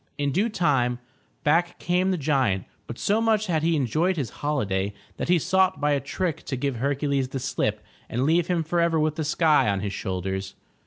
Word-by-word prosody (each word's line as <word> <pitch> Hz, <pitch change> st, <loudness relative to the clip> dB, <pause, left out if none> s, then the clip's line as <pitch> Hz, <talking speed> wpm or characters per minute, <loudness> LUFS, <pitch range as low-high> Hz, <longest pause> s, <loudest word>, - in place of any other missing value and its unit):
In 145 Hz, -1 st, 0 dB
due 200 Hz, -, +1 dB
time 135 Hz, -, +1 dB, 0.5 s
back 165 Hz, +3 st, +2 dB
came 180 Hz, +2 st, +1 dB
the 185 Hz, -, +1 dB
giant, 130 Hz, -, +1 dB, 0.2 s
but 120 Hz, -, -7 dB
so 210 Hz, +3 st, +1 dB
much 220 Hz, -2 st, +2 dB
had 165 Hz, -5 st, 0 dB
he 165 Hz, +1 st, +2 dB
enjoyed 155 Hz, -, +1 dB
his 130 Hz, -8 st, -2 dB
holiday, 100 Hz, -10 st, -1 dB, 0.2 s
that -, -, -3 dB
he 180 Hz, -, +5 dB
sought 190 Hz, +3 st, +2 dB
by 150 Hz, 0 st, +1 dB
a 140 Hz, -, +2 dB
trick 160 Hz, +4 st, -3 dB
to 135 Hz, -, -3 dB
give 130 Hz, -1 st, -2 dB
Hercules 140 Hz, +1 st, 0 dB
the 135 Hz, +1 st, -4 dB
slip -, -, -1 dB, 0.3 s
and 120 Hz, +3 st, -1 dB
leave 165 Hz, +2 st, +3 dB
him 175 Hz, -2 st, +1 dB
forever 170 Hz, 0 st, +1 dB
with 155 Hz, 0 st, +1 dB
the 160 Hz, -, -2 dB
sky 155 Hz, -1 st, +3 dB
on 100 Hz, -1 st, 0 dB
his 100 Hz, -1 st, -3 dB
shoulders. 95 Hz, +1 st, -4 dB
150 Hz, 200 wpm, -25 LUFS, 130-175 Hz, 0.5 s, he